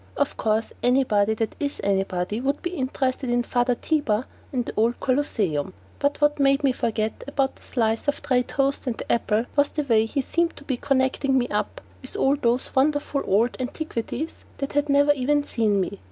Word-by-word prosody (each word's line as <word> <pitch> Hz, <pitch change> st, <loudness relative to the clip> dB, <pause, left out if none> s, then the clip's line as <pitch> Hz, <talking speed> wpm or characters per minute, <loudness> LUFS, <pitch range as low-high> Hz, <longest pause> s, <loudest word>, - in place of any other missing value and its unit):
Of 285 Hz, -, 0 dB
course, 220 Hz, 0 st, 0 dB
anybody 220 Hz, -5 st, +3 dB
that 220 Hz, 0 st, -2 dB
is 285 Hz, -1 st, -3 dB
anybody 195 Hz, +1 st, 0 dB
would 275 Hz, +2 st, -1 dB
be 350 Hz, -, -2 dB
interested 260 Hz, -4 st, -2 dB
in 240 Hz, 0 st, +2 dB
Father 245 Hz, +1 st, +1 dB
Tiber 255 Hz, -6 st, 0 dB, 0.3 s
and 250 Hz, -3 st, -1 dB
the -, -, -5 dB
old 230 Hz, +3 st, +1 dB
Colosseum, 205 Hz, -, 0 dB, 0.3 s
but 285 Hz, 0 st, 0 dB
what 295 Hz, 0 st, +2 dB
made 275 Hz, 0 st, +3 dB
me 275 Hz, -, +4 dB
forget 220 Hz, -3 st, -2 dB
the 285 Hz, -, -9 dB
one 270 Hz, -1 st, +2 dB
slice 225 Hz, 0 st, -1 dB
of 285 Hz, -, +1 dB
dry 255 Hz, -3 st, +3 dB
toast 275 Hz, +2 st, -1 dB
and 235 Hz, -, -1 dB
the -, -, -4 dB
apple 225 Hz, -1 st, +1 dB
was 285 Hz, -1 st, +4 dB
the 300 Hz, -, -2 dB
way 225 Hz, -5 st, +3 dB
he 275 Hz, +4 st, -1 dB
seemed 340 Hz, +4 st, 0 dB
to -, -, -11 dB
be 265 Hz, -3 st, -2 dB
connecting 265 Hz, +1 st, +1 dB
me 245 Hz, -1 st, +1 dB
up -, -, -2 dB, 0.2 s
with -, -, -6 dB
all 275 Hz, -8 st, +3 dB
those 245 Hz, -2 st, 0 dB
wonderful 290 Hz, +1 st, +1 dB
old 225 Hz, +6 st, +2 dB
antiquities 270 Hz, +2 st, -4 dB
that 275 Hz, 0 st, -4 dB
had 290 Hz, +1 st, +1 dB
never 285 Hz, +1 st, +5 dB
even 290 Hz, +1 st, +1 dB
seen 220 Hz, -7 st, +1 dB
me. 195 Hz, +1 st, -3 dB
260 Hz, 195 wpm, -24 LUFS, 225-285 Hz, 0.3 s, never